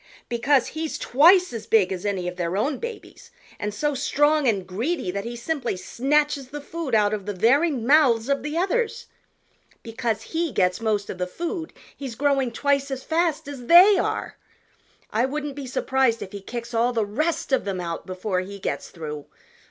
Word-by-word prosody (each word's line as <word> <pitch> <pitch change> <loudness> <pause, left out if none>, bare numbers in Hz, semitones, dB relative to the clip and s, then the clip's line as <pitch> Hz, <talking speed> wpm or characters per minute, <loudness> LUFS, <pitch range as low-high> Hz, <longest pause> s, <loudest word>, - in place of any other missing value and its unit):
"Because 245 +3 +2
he's 315 0 -4
twice 350 +5 +5
as 225 -2 -6
big 205 -5 +3
as 185 +2 -4
any 190 -3 -2
of 180 - -4
their 175 +1 -2
own 270 +6 0
babies 470 -1 -8 0.3
and 210 - -2
so 295 +8 -1
strong 295 +1 +2
and 200 -5 +1
greedy 215 - -2
that 200 +2 -4
he 240 +1 -5
simply 245 - -2
snatches 285 +6 0
the 295 +3 -7
food 300 -3 -3
out 210 -1 +3
of 205 -2 -4
the 205 - -3
very 265 - +4
mouths 255 -3 +3
of 280 0 +1
the 300 +2 -4
others. 460 +5 0 0.8
Because 225 -1 -2
he 325 +6 -2
gets 180 -1 +1
most 210 -2 0
of 185 - -9
the 180 - -1
food, 335 - -4 0.2
he's 265 -5 -7
growing 275 -2 +1
twice 280 +2 0
as 265 -1 -4
fast 325 -3 0
as 265 -4 -8
they 375 +5 +8
are. - - -2 0.7
I 230 +4 +2
wouldn't 295 +1 -4
be 280 -2 -6
surprised 260 -2 +1
if 190 - -10
he 200 - -7
kicks 235 +3 -7
all 235 +2 +2
the 225 -3 +1
rest 305 +11 -2
of 265 - +3
them 195 -2 -3
out 170 0 -5
before 185 +1 -2
he 195 +2 -6
gets 195 - -4
through. 150 -3 -7
250 Hz, 190 wpm, -24 LUFS, 205-295 Hz, 0.8 s, they